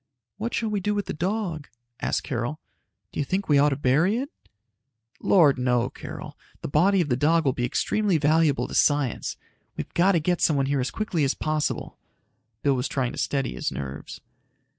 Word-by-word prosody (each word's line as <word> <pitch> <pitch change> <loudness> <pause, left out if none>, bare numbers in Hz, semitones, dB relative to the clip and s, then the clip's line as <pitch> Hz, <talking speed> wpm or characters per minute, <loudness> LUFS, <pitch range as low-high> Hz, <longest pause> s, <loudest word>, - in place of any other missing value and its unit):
"What 230 +3 -3
shall 225 - -1
we 210 -1 0
do 210 +2 -1
with 205 - -1
the - - -4
dog?" 175 -3 -2 0.3
asked - - 0
Carol. 130 +2 -3 0.5
"Do - - -6
you - - +2
think 190 +7 -2
we 145 -2 +4
ought 145 +1 +5
to 140 - -1
bury 150 - +2
it?" 275 +5 -4 0.9
"Lord 150 -9 +4
no, 125 0 +1
Carol. - - -8 0.3
The - - -4
body 180 +7 +3
of 155 - -2
the 125 - +2
dog 160 +5 +2
will 135 - +3
be 125 - -1
extremely 200 - +1
valuable 155 -1 +2
to - - -9
science. 145 -5 +1 0.4
We've - - -6
got 185 +3 +4
to 170 - +3
get 175 +3 0
someone 140 -4 +3
here 140 0 0
as 125 - -1
quickly 185 -8 -1
as 135 - +1
possible." 155 -1 -2 0.6
Bill 140 - +3
was 125 0 -1
trying 130 -3 -1
to - - -7
steady 135 -2 -1
his - - -3
nerves. 70 0 -7
150 Hz, 195 wpm, -25 LUFS, 135-185 Hz, 0.9 s, ought